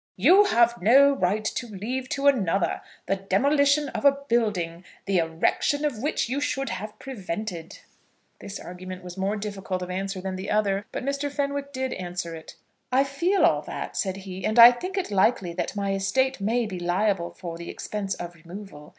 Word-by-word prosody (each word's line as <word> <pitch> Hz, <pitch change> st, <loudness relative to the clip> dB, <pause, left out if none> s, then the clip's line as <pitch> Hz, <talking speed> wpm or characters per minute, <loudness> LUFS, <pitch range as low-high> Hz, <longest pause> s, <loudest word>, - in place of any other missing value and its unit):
"You 360 Hz, -, +6 dB
have 235 Hz, -, +3 dB
no 275 Hz, +8 st, +6 dB
right 215 Hz, -3 st, 0 dB
to 240 Hz, -, -2 dB
leave 240 Hz, +5 st, -4 dB
to 280 Hz, 0 st, -2 dB
another 200 Hz, -10 st, +2 dB, 0.2 s
the 195 Hz, -, 0 dB
demolition 280 Hz, +9 st, +2 dB
of -, -, -5 dB
a 280 Hz, -, +8 dB, 0.2 s
building, 185 Hz, -8 st, 0 dB, 0.2 s
the 195 Hz, -2 st, +2 dB
erection 165 Hz, -, +1 dB
of 250 Hz, -8 st, -2 dB
which 295 Hz, -2 st, 0 dB
you 270 Hz, +4 st, -2 dB
should 270 Hz, -2 st, -1 dB
have 210 Hz, +2 st, -6 dB
prevented." 215 Hz, -8 st, -6 dB, 0.6 s
This 200 Hz, -, -7 dB
argument 185 Hz, +1 st, -8 dB
was 180 Hz, -1 st, -8 dB
more 195 Hz, +2 st, -1 dB
difficult 195 Hz, -3 st, -4 dB
of 180 Hz, -, -6 dB
answer 195 Hz, +1 st, -3 dB
than 190 Hz, 0 st, -4 dB
the 190 Hz, +2 st, -5 dB
other, 205 Hz, -1 st, +1 dB
but -, -, -4 dB
Mr. 280 Hz, +1 st, -1 dB
Fenwick 280 Hz, 0 st, -2 dB
did 260 Hz, -1 st, -2 dB
answer 175 Hz, -2 st, -5 dB
it. 160 Hz, -1 st, -10 dB, 0.4 s
"I 260 Hz, +2 st, +4 dB
feel 340 Hz, +8 st, +1 dB
all -, -, +3 dB
that," -, -, -6 dB
said 190 Hz, -3 st, -1 dB
he; 190 Hz, -1 st, -7 dB
"and 215 Hz, +4 st, 0 dB
I 235 Hz, +1 st, +11 dB
think 365 Hz, +11 st, -5 dB
it 375 Hz, -, -2 dB
likely 195 Hz, -2 st, +2 dB
that 180 Hz, -, -3 dB
my 200 Hz, -1 st, -1 dB
estate 240 Hz, +6 st, 0 dB
may 230 Hz, +4 st, +1 dB
be 190 Hz, -4 st, -5 dB
liable 175 Hz, 0 st, 0 dB
for 170 Hz, -3 st, -8 dB
the 170 Hz, -, -7 dB
expense 200 Hz, -2 st, -4 dB
of 175 Hz, 0 st, -7 dB
removal. 170 Hz, -2 st, -11 dB
205 Hz, 185 wpm, -25 LUFS, 185-265 Hz, 0.6 s, I